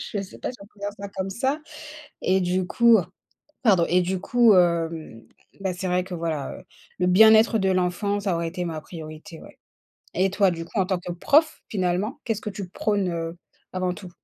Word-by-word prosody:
je 205 - -4
sais 190 - -11
pas - - -3
si 250 - -11
on 200 - -11
peut 205 -1 -24
dire 205 - -2
ça 200 0 -6
comme 190 -1 -4
ça, 265 +8 -1 0.6
et 190 +1 +2
du 180 +1 0
coup 235 +2 +5 0.7
pardon 195 -8 +5
et 180 +1 +4
du 185 +1 -1
coup, 235 +2 +4
hem, 165 -9 0 0.3
bah, 190 -2 -1
c'est 185 +1 -4
vrai 180 0 +1
que 185 - -9
voilà, 165 -5 -3
heu, - - -15 0.4
le 180 - +2
bien-être 220 +4 +6
de 195 -2 +1
l'enfant, 185 +3 0
ça 195 -3 -1
aurait 170 0 -2
été 180 +2 -4
ma 160 -2 -4
priorité, 155 0 -10
ouais. - - -14 0.6
Et 190 +2 +2
toi 200 -1 +3
du 165 -1 -4
coup, 210 - -4
en 190 - +3
tant 190 - 0
que 175 0 -6
prof, 300 - +2
finalement, 190 +5 -1
qu'est-ce 225 -2 -2
que 210 - -4
tu 195 -2 -6
prône, 200 0 -1
heu, 165 0 -4 0.4
avant 185 -1 -1
tout? 185 -1 -10
185 Hz, 210 wpm, -24 LUFS, 175-205 Hz, 0.7 s, bien-être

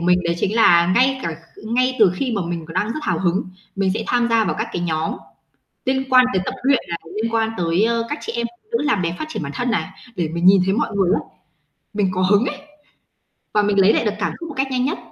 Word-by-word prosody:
mình 180 +1 +3
đấy 170 0 0
chính 205 +5 -1
là 170 -6 +6
ngay 260 +4 +3
cả 165 - -3 0.2
kh - - -12
ngay 255 +2 +1
từ 205 -5 +5
khi 250 +6 -2
mà 200 -4 -1
mình 170 -2 -4
còn 165 - -10
đang 185 +3 +1
rất 235 +8 -4
hào - - 0
hứng, 185 +1 0 0.3
mình 195 -1 +1
sẽ 220 0 -3
tham 240 -1 +1
gia 225 -1 +3
vào 190 - -1
các 220 +1 -2
cái 175 - -3
nhóm 160 -1 -1 0.7
liên 265 +1 +1
quan 255 -1 +6
tới 185 - +1
tập - - -3
luyện 270 0 +3
này, 170 - -3 0.2
liên 230 0 -2
quan 225 -1 +1
tới, 170 +3 +1
ờ, 230 0 +1
các 295 - -2
chị - - -5
em 235 0 -1 0.2
phụ 430 - -38
nữ - - -3
làm 255 -10 +1
đẹp, 170 0 -2
phát - - -3
triển 310 - -4
bản 140 - -5
thân 245 0 -1
nè, 220 - -1 0.3
để 175 -4 -1
mình 170 +2 -3
nhìn 190 0 +7
thấy 190 - +1
mọi 230 +1 0
người 190 -3 +2
á, - - 0 0.8
mình 200 -2 +1
có 185 - 0
hứng 205 +4 +4
ấy. 290 - -3 1.0
Và 210 - +4
mình 205 -1 +2
lấy 195 +3 +6
lại - - +1
được 210 - +1
cảm 210 - -1
xúc 335 -1 -7
một 290 - -8
cách 270 +1 +1
nhanh 255 -1 0
nhất. 305 +6 -1
210 Hz, 275 wpm, -20 LUFS, 180-245 Hz, 1.0 s, nhìn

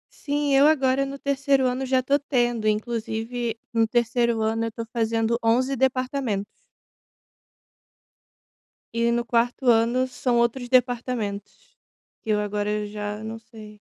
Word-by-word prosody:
Sim, 290 -1 -1
eu 280 +2 +6
agora 275 -3 +2
no 275 +1 -6
3º 275 -1 +1
ano 255 +1 -1
já 260 -1 +2
tô 280 +2 +2
tendo, 240 -5 0
inclusive 225 +1 -2
no 225 -1 +3
3º 235 -1 +1
ano 225 +1 0
eu 230 - -3
tô 230 +1 -6
fazendo 225 0 0
11 255 +4 +2
departamentos. 255 -5 -1 2.4
E 235 0 +2
no 235 0 0
4º 240 +3 0
ano 235 +3 +2
são 250 -1 -1
outros 240 +1 0
departamentos, 245 - -1 0.5
que - - -10
eu 210 -1 +2
agora 210 0 -2
já 210 +1 -5
não 225 +1 -6
sei. 215 -2 -14
235 Hz, 135 wpm, -24 LUFS, 220-260 Hz, 2.4 s, eu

